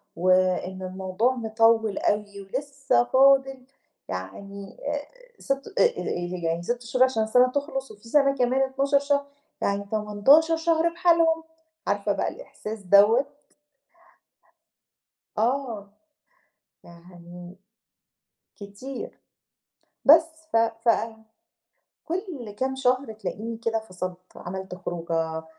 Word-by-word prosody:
وإن 185 +1 +1
الموضوع 190 +6 -1
مِطوِّل 225 -2 +2
أوي 205 -1 -1
ولسّه 265 +3 0
فاضل 270 0 +3 0.4
يعني 195 - -7
آآ 290 0 -1 0.4
6 275 0 -3
آآ - - +7 0.2
ي 175 0 -3
يعني 165 +1 -1
6 240 +6 -2
شهور 250 +2 +2
عشان 255 -4 0
السَنة 250 +3 +4
تخلص، 270 -2 -3
وفي 210 +2 -15
سَنة 275 0 +4
كمان 255 +1 +1
12 275 +1 +2
شهر، 280 0 0 0.4
يعني 200 0 -1
18 220 +10 +4
شهر 330 0 +2
بحالهم، 335 -2 +3 0.4
عارفة 205 0 0
بقى - - -1
الإحساس 220 - -8
دوّة؟ 205 +7 +5 2.1
آه. 230 -3 -1 1.0
يعني 175 +1 -13 1.0
كتير. 250 - -8 0.9
بس، 315 +4 +9 0.3
ف - - +2
ف 225 +1 +1 1.2
كل 335 - -5
كام 265 0 -1
شهر 255 -2 +1
تلاقيني 220 +1 -5
كده 225 -1 -1
فصلت، 185 -4 -6 0.2
عملت 190 +1 -6
خروجة، 165 -2 -3
225 Hz, 105 wpm, -25 LUFS, 190-275 Hz, 2.1 s, بس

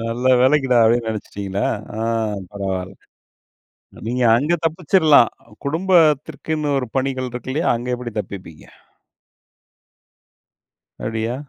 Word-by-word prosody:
"நல்ல 115 +3 -1
வேலைக்குடா" 130 -1 +3
அப்படீன்னு 115 0 +2
நெனைச்சிட்டீங்களா? 100 -2 -3 0.3
ஆ, - - -4 0.5
பரவால்ல. 95 -2 -4 1.1
நீங்க 125 +2 0
அங்க 150 +7 +1
தப்பிச்சிரலாம். 160 -4 +4 0.4
குடும்பத்திற்குன்னு 155 -3 +1
ஒரு 125 -3 -4
பணிகள் 130 -1 -1
இருக்கு 125 +1 -6
இல்லையா? 160 +5 0
அங்க 120 +2 -5
எப்படி 120 -2 -7
தப்பிப்பீங்க? 95 -6 -8 2.4
அப்டியா? 110 +2 -2
125 Hz, 95 wpm, -20 LUFS, 110-150 Hz, 2.4 s, தப்பிச்சிரலாம்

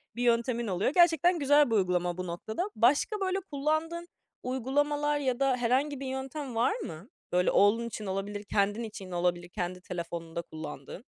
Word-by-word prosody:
bir 245 - -2
yöntemin 235 0 +1
oluyor. 190 +4 +1
Gerçekten 345 0 +5
güzel 290 -1 +5
bir - - +3
uygulama 180 -3 +1
bu 185 0 -4
noktada. 220 - -3
Başka 285 - +3
böyle 380 -1 0
kullandığın 315 +4 -1 0.4
uygulamalar 290 +4 0
ya 260 -3 -1
da 270 -2 +2
herhangi 260 +4 +1
bir 275 - -5
yöntem 265 0 -5
var 235 - +2
mı, 200 - -8 0.2
böyle 180 0 +3
oğlun 225 +4 +4
için 215 -1 -6
olabilir, 200 +2 -3
kendin 205 +2 0
için 200 -4 -8
olabilir, 175 0 0
kendi 180 -1 -4
telefonunda 170 -1 -5
kullandığın? 160 +3 -8
235 Hz, 165 wpm, -29 LUFS, 185-290 Hz, 0.4 s, Gerçekten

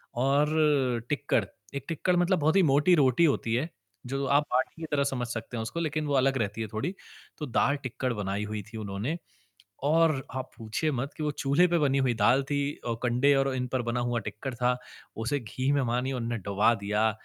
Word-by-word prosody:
और 140 -1 +2
टिक्कड़। 145 -6 +1 0.3
एक 140 -1 -4
टिक्कड़ 170 +3 0
मतलब 175 +1 +2
बहुत 155 +3 +2
ही 195 - +6
मोटी 150 +4 +4
रोटी 140 +1 +4
होती 130 -6 +1
है, 140 +7 -1 0.4
जो 135 +2 -2
आप 140 +2 +3
बाटी 130 +6 0
की - - -3
तरह 145 -1 +2
समझ 130 -3 -2
सकते 115 +1 -5
हैं - - -2
उसको 140 +9 -4
लेक़िन 155 -2 -1
वो 145 - -1
अलग 135 0 +3
रहती 110 -1 -2
है 110 - -2
थोड़ी। 145 - -2 0.4
तो 150 - -4
दाल, 140 +2 +2
टिक्कड़ 130 0 -2
बनाई 100 -1 -2
हुई 105 0 -4
थी - - -5
उन्होंने 105 +9 -3 0.7
और 155 -2 +3
आप 130 0 -4
पूछिए 115 +7 -2
मत 135 +2 -2
कि 155 - -5
वो 150 - 0
चूल्हे 145 +4 +3
पे 170 0 +2
बनी 140 -3 +2
हुई 130 -3 +2
दाल 125 +4 +4
थी, 140 0 -1
अ, 120 - 0
कंडे 125 +3 +3
और 135 -1 +1
इन 125 0 -1
पर 130 -1 +1
बना 120 +1 -1
हुआ 120 0 0
टिक्कड़ 105 +6 -6
था, 125 +1 +1 0.4
उसे 115 +6 -1
घी 130 +4 -2
में 140 -1 +2
मानिए 125 +2 0
उन्होंने 120 -2 -2
डूबा 100 +4 +3
दिया, 105 +2 +2
130 Hz, 210 wpm, -28 LUFS, 120-145 Hz, 0.7 s, ही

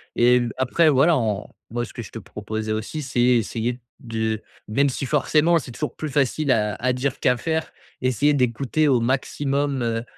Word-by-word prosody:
et 125 +1 +5
l 120 -1 -1
après, 145 +6 +3
voilà, 150 +4 +4
on 105 -3 -1 0.2
moi, 120 +1 -2
ce - - -13
que - - -6
je 110 - -9
te - - -7
proposais 110 +1 -5
aussi 110 +8 -3
c'est 125 -2 -3
essayer 120 0 +1 0.2
de- 110 -3 -2 0.3
même 140 +6 +2
si 135 - -3
forcément 155 +4 +3
c'est 125 - -9
toujours 150 +5 -4
plus 155 - -4
facile 140 +1 +1
à 105 -3 +2
à 130 +1 0
dire 125 +1 -2
qu'à 125 -1 +2
faire- 160 +4 -2 0.3
essayer 130 +4 +2
d'écouter 135 +4 +1
au 130 -4 +4
maximum, 135 +2 0
heu, 115 0 -1
125 Hz, 190 wpm, -23 LUFS, 115-145 Hz, 0.3 s, et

